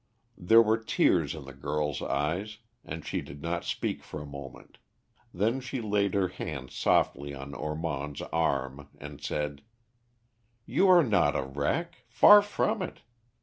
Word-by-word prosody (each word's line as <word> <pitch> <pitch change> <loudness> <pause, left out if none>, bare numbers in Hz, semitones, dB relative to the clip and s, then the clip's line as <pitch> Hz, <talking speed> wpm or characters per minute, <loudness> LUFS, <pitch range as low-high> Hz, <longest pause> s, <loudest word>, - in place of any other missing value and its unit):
There 110 +6 +6
were 110 +1 +2
tears 110 - +2
in 75 -3 -9
the 70 - -10
girl's 75 +1 -2
eyes, 85 +10 -2 0.3
and 80 0 -7
she - - -2
did 70 - -10
not 85 +1 -2
speak - - -2
for 75 - -7
a 75 - -7
moment, 70 -1 -11 0.5
then 110 +8 0
she 130 0 -5
laid 105 -3 0
her 95 -2 +2
hand 70 -7 -6
softly 70 +1 +1
on 70 +1 -8
Ormond's 75 -2 -4
arm, 70 -3 -1
and - - -10
said, 75 -1 -3 1.0
"You 195 - +2
are 180 -2 +7
not 100 - +2
a - - 0
wreck, 70 - -2
far 205 0 +8
from 205 +1 -1
it. 185 - -6
75 Hz, 150 wpm, -28 LUFS, 70-110 Hz, 1.0 s, far